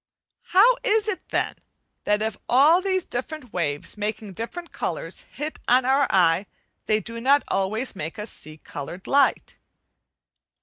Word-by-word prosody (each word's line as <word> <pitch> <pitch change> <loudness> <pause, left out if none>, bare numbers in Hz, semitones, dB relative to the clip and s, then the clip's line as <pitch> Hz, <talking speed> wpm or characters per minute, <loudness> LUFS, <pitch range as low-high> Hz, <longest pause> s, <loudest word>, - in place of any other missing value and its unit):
How 460 +7 +5
is 435 0 +2
it 410 -4 -4
then, - - -1 0.5
that 210 +1 +2
if 220 -2 -2
all 295 +8 +6
these 375 -1 0
different 255 0 -6
waves 155 +2 -2
making 210 -1 -3
different 335 - -6
colours, - - -4
hit 300 +2 -5
on 250 +1 +4
our 270 +2 +3
eye, 180 +1 +3 0.4
they 215 0 +3
do 230 +1 -6
not 280 +3 +4
always 215 +6 -1
make 160 +2 -5
us 210 +1 -5
see 155 +1 -10
coloured 155 +5 -8
light? 280 0 +2
230 Hz, 145 wpm, -24 LUFS, 195-300 Hz, 0.5 s, all